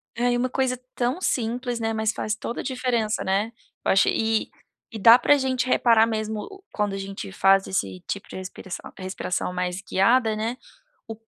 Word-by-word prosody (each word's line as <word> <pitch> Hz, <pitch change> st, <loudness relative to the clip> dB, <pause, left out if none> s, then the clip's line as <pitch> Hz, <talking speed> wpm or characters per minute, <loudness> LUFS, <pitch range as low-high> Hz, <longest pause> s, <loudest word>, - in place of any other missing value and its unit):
É. 245 Hz, +2 st, +1 dB
E 245 Hz, -, +1 dB
uma 255 Hz, +1 st, 0 dB
coisa 255 Hz, -1 st, 0 dB, 0.2 s
tão 250 Hz, +8 st, -1 dB
simples, 245 Hz, -3 st, -1 dB
né, 225 Hz, 0 st, -1 dB
mas 220 Hz, 0 st, 0 dB
faz 215 Hz, 0 st, -2 dB
toda 235 Hz, -, -5 dB
a -, -, -9 dB
diferença, 250 Hz, -4 st, -1 dB
né. 200 Hz, +4 st, 0 dB, 0.3 s
Eu -, -, +2 dB
achei 195 Hz, -, +4 dB
e 225 Hz, 0 st, 0 dB, 0.4 s
e 220 Hz, -, -5 dB
dá 230 Hz, +4 st, +9 dB
para 255 Hz, +3 st, +4 dB
a -, -, +1 dB
gente 260 Hz, -1 st, 0 dB
reparar 230 Hz, -3 st, +5 dB
mesmo 215 Hz, -1 st, -3 dB
o 390 Hz, -, -11 dB
quando 210 Hz, -1 st, 0 dB
a 195 Hz, -, -3 dB
gente 195 Hz, -, -6 dB
faz 195 Hz, -, +4 dB
esse 95 Hz, -, -3 dB
tipo 200 Hz, -, -5 dB
de -, -, -10 dB
respiração 185 Hz, 0 st, -7 dB
respiração 185 Hz, -1 st, -3 dB
mais 180 Hz, +1 st, -2 dB
guiada, 220 Hz, +3 st, +2 dB
né, 225 Hz, +3 st, -2 dB, 0.5 s
o 225 Hz, -, -6 dB
220 Hz, 195 wpm, -24 LUFS, 195-245 Hz, 0.5 s, dá